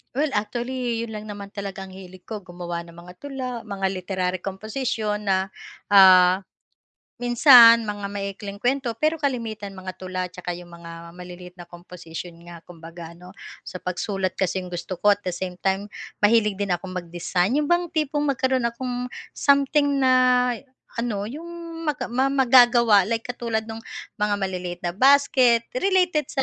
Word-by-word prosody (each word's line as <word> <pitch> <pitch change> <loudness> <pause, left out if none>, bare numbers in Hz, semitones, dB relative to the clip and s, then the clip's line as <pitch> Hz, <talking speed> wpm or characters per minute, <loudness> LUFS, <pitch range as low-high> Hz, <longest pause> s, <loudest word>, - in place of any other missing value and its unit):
Well, 295 +1 +1
actually 240 +1 -2
'yon 230 - -5
lang 215 -1 -7
naman 200 -1 -8
ang 195 -1 -6
hilig 185 -1 -12
ko, 220 - -4
gumawa 175 -1 -6
ng 170 - -14
mga 175 +1 -13
tula, 270 -3 -6 0.2
mga 195 -2 -4
literary 185 -1 -2
composition 210 +2 -3
na, 190 0 +1 0.4
ah, 185 -1 +7 0.8
minsan 240 -2 +8
mga 205 -1 -4
maiikling 200 0 -6
kuwento 255 +1 0
pero 310 +1 +2
kalimitan 225 -7 -3
mga 185 0 -7
tula 185 0 -4
at 180 - -17
saka 180 -1 -6
'yong 175 0 -6
mga 170 0 -10 0.2
maliliit 180 0 -11
na 175 -1 -13
composition 175 -1 -9
nga 175 0 -11
kumbaga 170 0 -11
ano. 180 +1 -14 0.3
Sa 185 - -8
pagsulat 185 +1 -3
kasi 190 0 -1
'yong 180 -1 -7
gusto 175 +1 -5
ko, 205 +1 +4
at 205 - -22
the 180 - -2
same 180 +1 -5
time 195 +2 -1 0.3
mahilig 210 -2 +3
din 200 -3 0
akong 185 +1 -5
mag-design, 175 +5 -1
'yon 295 +2 0
bang 345 0 +2
tipong 295 -1 0
magkaroon 260 -2 +1
akong 245 +1 -4 0.2
something 280 0 +2
na 255 -1 +4 0.5
ano 215 -3 -2
'yong 330 +5 -8 0.4
maga 290 -5 -2
ma 260 +3 +1
magagawa 240 -6 +5
like 230 0 -1
katulad 235 -2 -3
nung 220 - -6 0.4
mga 210 0 +1
maliliit 185 -3 -4
na 175 - -1
basket, 260 -3 +4 0.2
related 360 -5 +2
sa, 270 - -2
205 Hz, 160 wpm, -23 LUFS, 180-250 Hz, 0.8 s, minsan